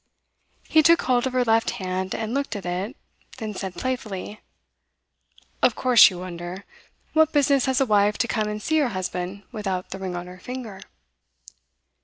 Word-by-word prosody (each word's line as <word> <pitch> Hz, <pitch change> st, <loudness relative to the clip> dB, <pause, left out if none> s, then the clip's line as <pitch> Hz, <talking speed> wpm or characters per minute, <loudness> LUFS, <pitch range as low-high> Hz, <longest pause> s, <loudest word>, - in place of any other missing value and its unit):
He 315 Hz, -, +5 dB
took 335 Hz, +2 st, +5 dB
hold 250 Hz, 0 st, +2 dB
of 260 Hz, -, -5 dB
her 255 Hz, -1 st, +3 dB
left 225 Hz, -1 st, +2 dB
hand, 185 Hz, 0 st, -3 dB
and 220 Hz, +1 st, -3 dB
looked 275 Hz, -5 st, -2 dB
at 200 Hz, -, -6 dB
it, 185 Hz, -, -3 dB, 0.4 s
then 220 Hz, -4 st, -5 dB
said 190 Hz, -1 st, -5 dB
playfully: 215 Hz, -5 st, -4 dB, 1.2 s
'Of 245 Hz, -, +4 dB
course 250 Hz, -4 st, +7 dB
you 185 Hz, -, -8 dB
wonder. 180 Hz, +1 st, -7 dB, 0.5 s
What 315 Hz, 0 st, +4 dB
business 280 Hz, -2 st, +3 dB
has 265 Hz, 0 st, +2 dB
a 270 Hz, -, +3 dB
wife 210 Hz, -2 st, +3 dB
to 240 Hz, -, 0 dB
come 215 Hz, -2 st, -1 dB
and 210 Hz, 0 st, -3 dB
see 315 Hz, 0 st, +2 dB
her 280 Hz, -4 st, +2 dB
husband 185 Hz, +2 st, -4 dB
without 195 Hz, -5 st, -4 dB
the 190 Hz, -, -5 dB
ring 185 Hz, -2 st, -4 dB
on 175 Hz, 0 st, -5 dB
her 180 Hz, +1 st, -11 dB
finger? 230 Hz, -3 st, -7 dB
215 Hz, 175 wpm, -24 LUFS, 185-255 Hz, 1.2 s, course